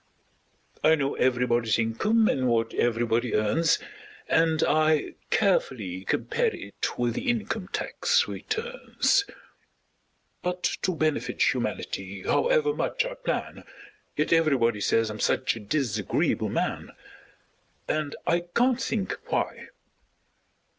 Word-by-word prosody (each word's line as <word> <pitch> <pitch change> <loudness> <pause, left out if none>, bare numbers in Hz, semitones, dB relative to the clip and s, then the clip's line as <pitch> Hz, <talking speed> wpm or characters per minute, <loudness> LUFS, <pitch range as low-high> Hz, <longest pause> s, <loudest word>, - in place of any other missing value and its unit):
I 160 +1 +6
know 140 -2 -1
everybody's 120 -3 +1
income 210 - +2
and 130 -2 +1
what 115 -1 +1
everybody 120 0 +1
earns, 110 +11 +2 0.5
And 160 -1 +2
I 155 0 +2 0.2
carefully 110 - 0
compare - - 0
it 100 - -5
with 120 -1 0
the 250 - -2
income 220 -4 -2
tax 480 - +1
returns; 450 -2 -1 1.2
But 180 0 -3 0.2
to 185 - 0
benefit 155 -2 +1
humanity, 95 0 -4
however 470 -2 +2
much 465 +2 -1
I - - -4
plan, - - -4 0.5
Yet 150 +2 +2
everybody 130 -10 +2
says 115 +1 +2
I'm 105 - -7
such - - +1
a - - -7
disagreeable 110 - 0
man! - - -2 1.0
And 155 -2 -1
I 170 - +2 0.2
can't 250 +1 +3
think 205 -4 -1
why! - - -2
150 Hz, 115 wpm, -26 LUFS, -, 1.2 s, I